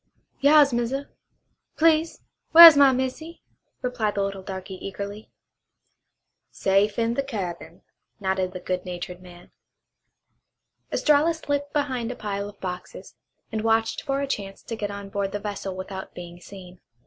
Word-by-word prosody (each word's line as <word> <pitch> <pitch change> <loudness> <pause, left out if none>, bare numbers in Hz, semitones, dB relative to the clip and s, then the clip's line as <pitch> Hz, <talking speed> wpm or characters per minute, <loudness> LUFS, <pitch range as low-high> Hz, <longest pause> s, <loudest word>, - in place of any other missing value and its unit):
"Yas, 285 -1 +5
Massa! 245 +4 -2 0.7
Please 320 0 +2 0.3
whar' 340 +1 +14
is 325 -3 +11
my 280 -1 +6
missy?" 260 +6 -4 0.4
replied 245 -4 -1
the 200 - 0
little 195 -1 -4
darky 190 0 -7
eagerly. 200 +2 -7 1.2
"Safe 200 +2 +1
in 230 0 +1
the 275 - 0
cabin," 205 -11 -6 0.4
nodded 190 -2 -1
the 185 - -7
good 180 0 -3
natured 180 0 -7
man. 175 -1 -15 1.4
Estralla 305 +2 +3
slipped 285 -2 -3
behind 260 -5 -2
a - - -6
pile 200 -2 -4
of 205 - -16
boxes, 180 -1 -7 0.4
and 220 -1 -2
watched 225 0 +1
for 275 -1 -2
a 280 - -2
chance 195 -7 -5
to 230 - -5
get 210 -2 -4
on 200 -1 -7
board 195 0 -2
the 205 - -2
vessel 200 -2 -5
without 190 0 -7
being 175 0 -9
seen. 185 -2 -13
210 Hz, 150 wpm, -24 LUFS, 190-275 Hz, 1.4 s, whar